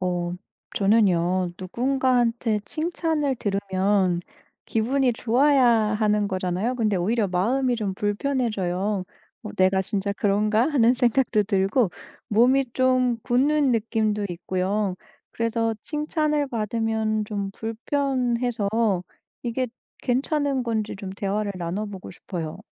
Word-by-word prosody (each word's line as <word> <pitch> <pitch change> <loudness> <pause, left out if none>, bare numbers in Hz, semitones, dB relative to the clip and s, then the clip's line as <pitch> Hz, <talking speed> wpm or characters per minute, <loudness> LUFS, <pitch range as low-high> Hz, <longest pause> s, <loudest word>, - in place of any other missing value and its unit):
어. 175 -1 -1 0.4
저는요 185 -4 +2
누군가한테 240 +1 +1
칭찬을 315 -2 -1
들으면 195 -3 +1 0.4
기분이 250 +3 +1
좋아야 260 +4 +3
하는 215 -2 +2
거잖아요. 185 +5 -1
근데 215 -4 +1
오히려 205 +4 +1
마음이 245 +8 +1
좀 205 -4 -2
불편해져요. 205 -4 -1 0.4
'어 215 - -6
내가 190 +1 +3
진짜 200 0 -2
그런가?'하는 220 +6 +3
생각도 245 -3 +2
들고 200 +2 +1 0.4
몸이 245 +3 +3
좀 255 -2 +2
굳는 275 +3 +2
느낌도 215 -2 0
있고요. 185 +3 -1 0.4
그래서 230 0 0
칭찬을 300 -1 0
받으면 220 -1 -1
좀 200 -2 -3
불편해서 245 -1 -1 0.7
이게 250 +2 -1 0.3
괜찮은 275 +1 0
건지 220 -4 -2
좀 195 -1 -7
대화를 200 +1 -2
나눠 175 +5 -3
보고 195 -3 -8
싶어요. 170 -3 -6
220 Hz, 260 characters per minute, -24 LUFS, 195-250 Hz, 0.7 s, 좋아야